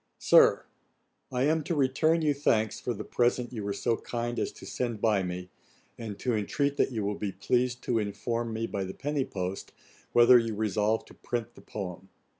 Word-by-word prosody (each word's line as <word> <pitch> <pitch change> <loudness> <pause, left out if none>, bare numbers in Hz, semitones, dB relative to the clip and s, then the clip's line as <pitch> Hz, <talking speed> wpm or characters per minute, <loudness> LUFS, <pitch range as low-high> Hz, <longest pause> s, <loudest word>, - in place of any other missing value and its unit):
SIR, - - +5 0.7
'I 125 0 0
am 155 +2 +2
to 170 - -1
return 155 +4 +2
you 150 -1 +3
thanks 110 -6 +1
for 125 - -3
the 105 - -5
present 120 +1 0
you 110 -3 -4
were 100 - -2
so 115 +3 0
kind 120 0 -3
as - - -1
to - - -12
send 120 -4 -3
by 105 -2 +2
me, 90 0 -5 0.4
and 110 -4 -6
to 125 - -1
intreat 140 +7 0
that - - +2
you 110 -4 -2
will 105 - 0
be 100 -2 -3
pleased 125 +4 0
to 115 -2 +1
inform 115 +3 -2
me 110 +1 -2
by 100 -3 -3
the 95 0 -6
penny 145 -1 -1
post, 95 0 -5 0.4
whether 120 +1 +7
you 115 -2 -2
resolve 105 +1 0
to - - -15
print 120 -1 -4
the - - -15
poem. 95 -2 -7
115 Hz, 200 wpm, -29 LUFS, 105-125 Hz, 0.7 s, whether